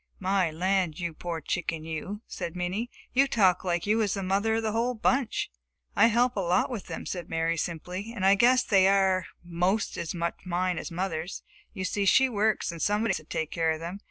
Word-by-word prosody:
"My 190 Hz, -2 st, +1 dB
land, 180 Hz, 0 st, 0 dB
you 170 Hz, -2 st, -3 dB
poor 165 Hz, 0 st, -5 dB
chicken, 165 Hz, -2 st, -3 dB
you!" 185 Hz, +7 st, -5 dB
said 170 Hz, -, -6 dB
Minnie. 185 Hz, +7 st, -2 dB, 0.2 s
"You 275 Hz, +2 st, +4 dB
talk 190 Hz, -8 st, +3 dB
like 175 Hz, -2 st, -1 dB
you 215 Hz, +2 st, +2 dB
was 210 Hz, -3 st, +1 dB
the 195 Hz, -, -3 dB
mother 200 Hz, +4 st, +1 dB
of 225 Hz, -, -1 dB
the 220 Hz, -, 0 dB
whole 235 Hz, +3 st, 0 dB
bunch!" 245 Hz, -, 0 dB, 0.4 s
"I -, -, +6 dB
help 240 Hz, +2 st, +2 dB
a -, -, -1 dB
lot 180 Hz, +6 st, +1 dB
with 220 Hz, -7 st, -5 dB
them," -, -, -6 dB
said 175 Hz, -2 st, -5 dB
Mary 165 Hz, +1 st, 0 dB
simply, 180 Hz, +6 st, -4 dB
"and 205 Hz, -5 st, -3 dB
I 195 Hz, -, +7 dB
guess 250 Hz, +5 st, +4 dB
they 190 Hz, -2 st, +4 dB
are 190 Hz, -1 st, +3 dB, 0.2 s
'most 180 Hz, +4 st, 0 dB
as 170 Hz, -, -4 dB
much 170 Hz, 0 st, -2 dB
mine 180 Hz, 0 st, -1 dB
as -, -, -6 dB
mother's. 175 Hz, 0 st, -4 dB, 0.3 s
You 185 Hz, -, -3 dB
see 200 Hz, +1 st, -1 dB
she 265 Hz, +7 st, +5 dB
works 215 Hz, -4 st, +1 dB
and 170 Hz, -1 st, -8 dB
somebody 210 Hz, +1 st, +1 dB
has -, -, 0 dB
to 155 Hz, -, -12 dB
take 160 Hz, 0 st, -3 dB
care 165 Hz, -1 st, +1 dB
of 160 Hz, 0 st, 0 dB
them. 170 Hz, +4 st, -6 dB
190 Hz, 215 wpm, -28 LUFS, 170-215 Hz, 0.4 s, I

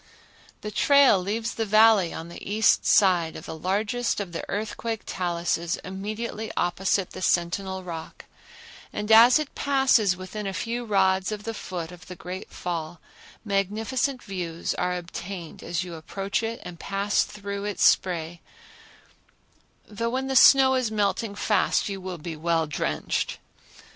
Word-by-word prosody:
The 210 Hz, -, -5 dB
trail 280 Hz, -4 st, +5 dB
leaves 220 Hz, +5 st, -2 dB
the 225 Hz, -, -2 dB
Valley 215 Hz, -4 st, +5 dB
on 165 Hz, -, -7 dB
the 170 Hz, -, -10 dB
east 215 Hz, +2 st, +2 dB
side 175 Hz, -5 st, +4 dB
of -, -, -9 dB
the -, -, -6 dB
largest 205 Hz, +9 st, -1 dB
of 195 Hz, -4 st, -4 dB
the 165 Hz, -, -5 dB
earthquake 220 Hz, +2 st, -3 dB
taluses 170 Hz, -1 st, -1 dB
immediately 215 Hz, +3 st, -5 dB
opposite 185 Hz, +1 st, 0 dB
the -, -, -8 dB
Sentinel 185 Hz, +2 st, 0 dB
Rock 165 Hz, -3 st, -8 dB, 0.7 s
and 210 Hz, +1 st, -3 dB
as 230 Hz, +4 st, +8 dB
it 305 Hz, -2 st, -4 dB
passes 260 Hz, -9 st, +3 dB
within 195 Hz, +3 st, -6 dB
a 195 Hz, -, -4 dB
few 235 Hz, +4 st, -3 dB
rods 190 Hz, -2 st, +2 dB
of 210 Hz, -1 st, -5 dB
the 225 Hz, -, -4 dB
foot 175 Hz, -5 st, -6 dB
of 180 Hz, 0 st, -13 dB
the 180 Hz, -, -8 dB
great 180 Hz, +1 st, -7 dB
fall, 170 Hz, -1 st, -5 dB, 0.5 s
magnificent 220 Hz, +7 st, -1 dB
views 175 Hz, -4 st, -4 dB
are 180 Hz, 0 st, -1 dB
obtained 175 Hz, 0 st, -7 dB
as 175 Hz, +1 st, -2 dB
you 180 Hz, -2 st, -8 dB
approach 195 Hz, +6 st, -3 dB
it 230 Hz, 0 st, -4 dB
and 175 Hz, -2 st, -9 dB
pass 200 Hz, +1 st, 0 dB
through 200 Hz, -1 st, -6 dB
its 205 Hz, -1 st, 0 dB
spray, 170 Hz, -2 st, +1 dB, 1.5 s
though 230 Hz, +2 st, -3 dB
when 260 Hz, +2 st, -2 dB
the 265 Hz, 0 st, -2 dB
snow 265 Hz, +1 st, +7 dB
is 255 Hz, -3 st, +1 dB
melting 205 Hz, 0 st, -1 dB
fast 205 Hz, -1 st, +1 dB
you 195 Hz, -1 st, -5 dB
will 185 Hz, -1 st, -5 dB
be 165 Hz, +1 st, -6 dB
well 165 Hz, +1 st, 0 dB
drenched. 75 Hz, -, -2 dB
195 Hz, 155 wpm, -25 LUFS, 175-220 Hz, 1.5 s, as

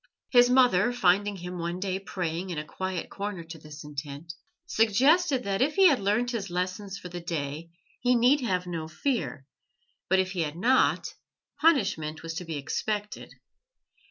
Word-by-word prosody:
His 245 Hz, -1 st, +6 dB
mother, 245 Hz, -5 st, +4 dB
finding 205 Hz, -2 st, +2 dB
him 180 Hz, -1 st, -7 dB
one 170 Hz, +1 st, -3 dB
day 190 Hz, 0 st, -2 dB
praying 180 Hz, -2 st, -4 dB
in 175 Hz, -, -4 dB
a 150 Hz, -, -3 dB
quiet 185 Hz, +1 st, -4 dB
corner 200 Hz, -3 st, -5 dB
to 165 Hz, 0 st, -10 dB
this 150 Hz, 0 st, -11 dB
intent, 150 Hz, +2 st, -7 dB, 0.3 s
suggested 265 Hz, -, +3 dB
that 200 Hz, +1 st, -1 dB
if 290 Hz, +3 st, +2 dB
he 385 Hz, -2 st, +7 dB
had 280 Hz, -, +2 dB
learnt 215 Hz, +5 st, +1 dB
his 210 Hz, -5 st, -3 dB
lessons 185 Hz, +3 st, -3 dB
for -, -, -9 dB
the 175 Hz, 0 st, -7 dB
day 160 Hz, -1 st, -4 dB, 0.3 s
he 245 Hz, 0 st, +3 dB
need 250 Hz, +5 st, +4 dB
have 185 Hz, -7 st, -1 dB
no 165 Hz, -3 st, -4 dB
fear, 165 Hz, -, -2 dB, 0.6 s
but 190 Hz, -, +4 dB
if 185 Hz, 0 st, +1 dB
he 185 Hz, -3 st, -2 dB
had 150 Hz, -1 st, -2 dB
not, 250 Hz, +9 st, +2 dB, 0.5 s
punishment 195 Hz, -, +2 dB
was 165 Hz, 0 st, -5 dB
to 175 Hz, +2 st, -5 dB
be 160 Hz, -2 st, -4 dB
expected. 210 Hz, +8 st, -4 dB
185 Hz, 170 wpm, -27 LUFS, 165-235 Hz, 0.6 s, he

